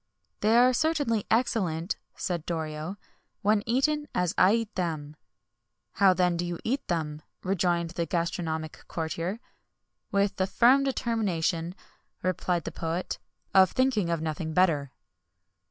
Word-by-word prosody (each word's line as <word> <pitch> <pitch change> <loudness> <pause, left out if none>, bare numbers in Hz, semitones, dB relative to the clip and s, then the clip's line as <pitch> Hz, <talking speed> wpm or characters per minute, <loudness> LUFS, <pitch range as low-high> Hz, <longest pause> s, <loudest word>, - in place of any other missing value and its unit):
"They 220 +2 +4
are 250 +1 +6
certainly 285 -7 +1
excellent," 190 -7 +1 0.2
said 175 -3 -3
Doric, 160 +2 -3 0.5
"when 210 +1 +3
eaten 295 +5 +1
as 180 -1 +1
I 185 +3 +5
eat 230 -2 -2
them." 155 -5 -3 0.8
"How, 195 -2 +5
then, 180 -1 +2
do 175 - -1
you 175 -1 -3
eat 270 +5 -1
them?" 155 -3 -2 0.2
rejoined 175 -3 +1
the 170 -1 -2
gastronomic 165 -2 -2
courtier. 165 +5 -3 0.7
"With 200 0 +1
the 190 -1 +1
firm 250 +7 +5
determination," 185 -9 -1 0.5
replied 180 -1 0
the - - -5
poet, 165 +2 -3 0.3
"of 190 -1 +6
thinking 255 -9 +2
of 165 -2 0
nothing 160 0 -3
better." 155 -7 +3
180 Hz, 130 wpm, -28 LUFS, 165-220 Hz, 0.8 s, are